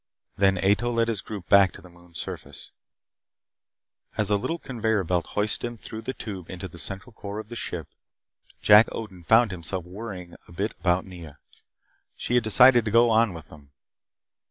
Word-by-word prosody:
Then 95 Hz, -1 st, +3 dB
Ato 100 Hz, +6 st, +2 dB
led 115 Hz, -1 st, +1 dB
his 110 Hz, -4 st, -1 dB
group 100 Hz, -5 st, -8 dB
back 100 Hz, -3 st, +6 dB
to -, -, -11 dB
the -, -, -13 dB
moon's 85 Hz, -1 st, -15 dB
surface. -, -, -7 dB, 1.5 s
As -, -, 0 dB
a -, -, +5 dB
little 165 Hz, +12 st, -2 dB
conveyor 110 Hz, -, -1 dB
belt 90 Hz, 0 st, -1 dB
hoisted 105 Hz, +1 st, +2 dB
him 120 Hz, 0 st, -8 dB
through 110 Hz, +1 st, -8 dB
the 130 Hz, +4 st, -5 dB
tube 95 Hz, -6 st, -7 dB
into 95 Hz, 0 st, -6 dB
the 85 Hz, -1 st, -12 dB
central 95 Hz, +8 st, -7 dB
core 100 Hz, -1 st, -7 dB
of 110 Hz, 0 st, -7 dB
the 120 Hz, -, -7 dB
ship, 85 Hz, -8 st, -4 dB, 0.8 s
Jack 105 Hz, +2 st, +8 dB
Odin 95 Hz, -6 st, -7 dB
found 115 Hz, +4 st, +4 dB
himself 90 Hz, 0 st, -4 dB
worrying 90 Hz, -2 st, -8 dB
a -, -, -16 dB
bit 100 Hz, +6 st, -2 dB
about 90 Hz, 0 st, +1 dB
Nea. 85 Hz, -6 st, -11 dB, 0.8 s
She -, -, -3 dB
had 125 Hz, -1 st, +4 dB
decided 120 Hz, +2 st, +6 dB
to -, -, 0 dB
go 115 Hz, +2 st, +5 dB
on 110 Hz, -1 st, +4 dB
with 80 Hz, -2 st, -10 dB
them. 70 Hz, -2 st, -16 dB
100 Hz, 180 wpm, -25 LUFS, 90-115 Hz, 1.5 s, Jack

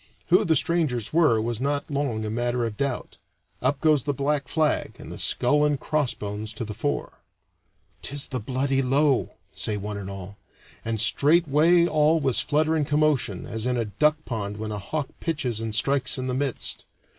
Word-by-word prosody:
Who 180 Hz, +5 st, +5 dB
the 160 Hz, -, +3 dB
strangers 150 Hz, -8 st, 0 dB
were 155 Hz, -9 st, +4 dB
was 115 Hz, +1 st, -2 dB
not 145 Hz, +1 st, -1 dB
long 135 Hz, -6 st, -1 dB
a 105 Hz, -, -3 dB
matter 120 Hz, +1 st, -1 dB
of 110 Hz, -2 st, -4 dB
doubt. 140 Hz, +2 st, -3 dB, 0.4 s
Up 140 Hz, -, +1 dB
goes 155 Hz, -3 st, +4 dB
the 145 Hz, -1 st, -1 dB
black 140 Hz, +1 st, 0 dB
flag, 155 Hz, -2 st, 0 dB
and -, -, -10 dB
the -, -, -7 dB
skull 145 Hz, +4 st, +2 dB
and 145 Hz, -2 st, +1 dB
crossbones 110 Hz, -9 st, -2 dB
to 110 Hz, +2 st, -5 dB
the 105 Hz, -, -6 dB
fore. -, -, -3 dB, 0.8 s
"'Tis 140 Hz, +1 st, -3 dB
the 130 Hz, -, -2 dB
bloody 135 Hz, +4 st, 0 dB
Low," 135 Hz, +1 st, +2 dB, 0.2 s
say 105 Hz, -, -2 dB
one 105 Hz, +1 st, -5 dB
and 100 Hz, -1 st, -6 dB
all; 100 Hz, 0 st, -8 dB, 0.5 s
and 115 Hz, -1 st, -2 dB
straightway 160 Hz, +7 st, +4 dB
all 155 Hz, 0 st, +3 dB
was 135 Hz, -5 st, +2 dB
flutter 155 Hz, +2 st, +1 dB
and 150 Hz, -3 st, 0 dB
commotion, 145 Hz, -9 st, +1 dB
as 110 Hz, +2 st, -3 dB
in 125 Hz, -1 st, 0 dB
a 115 Hz, -, 0 dB
duck 150 Hz, +9 st, +2 dB
pond 105 Hz, -4 st, -4 dB
when 110 Hz, 0 st, -4 dB
a 105 Hz, -, -4 dB
hawk 145 Hz, +8 st, -3 dB
pitches 135 Hz, -9 st, -2 dB
and 110 Hz, -1 st, -3 dB
strikes 130 Hz, +3 st, +2 dB
in 130 Hz, -, -3 dB
the 130 Hz, -, -2 dB
midst. 135 Hz, -1 st, -2 dB
135 Hz, 185 wpm, -25 LUFS, 110-150 Hz, 0.8 s, Who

